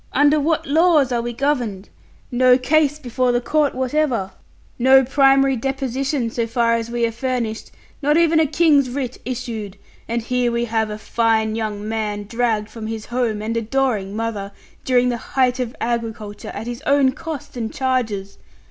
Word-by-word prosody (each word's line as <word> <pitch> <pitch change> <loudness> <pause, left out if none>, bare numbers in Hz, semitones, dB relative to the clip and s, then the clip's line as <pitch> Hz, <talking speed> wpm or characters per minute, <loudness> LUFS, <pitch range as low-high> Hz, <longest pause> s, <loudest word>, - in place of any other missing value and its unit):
Under 290 +2 +4
what 315 +2 0
laws 305 -2 +3
are 240 -1 +1
we 240 +1 -3
governed? 240 -7 -2 0.4
No 250 0 +5
case 295 +3 +2
before 255 -3 0
the 240 - +2
court 295 +3 +1
whatever; 255 -6 0 0.5
no 265 +2 +6
primary 270 0 +4
deposition, 270 0 -2
so 230 0 -1
far 230 0 +1
as 230 0 -1
we 235 0 0
are 230 - -1
furnished; 235 -2 -3 0.3
not 295 +2 +3
even 330 -1 +4
a 315 - +3
King's 295 -3 +3
writ 255 -1 -4
issued 225 -5 -5 0.3
and 235 0 -2
here 250 0 0
we 235 0 0
have 220 -1 0
a 210 - -5
fine 220 -1 +1
young 215 -2 -3
man 215 -2 -2
dragged 225 -1 -1
from 225 -2 -7
his 220 -1 -5
home 235 -4 -1
and 225 +2 -2
adoring 230 -4 -1
mother, 215 -3 -3 0.3
during 250 -1 +3
the 240 - -1
height 250 +1 0
of 245 -1 -3
agriculture, 225 -3 -4
at 215 - -6
his 240 +2 -6
own 280 -2 +4
cost 295 -1 -7
and 225 -2 -3
charges! 225 -7 -2
245 Hz, 170 wpm, -20 LUFS, 225-270 Hz, 0.5 s, no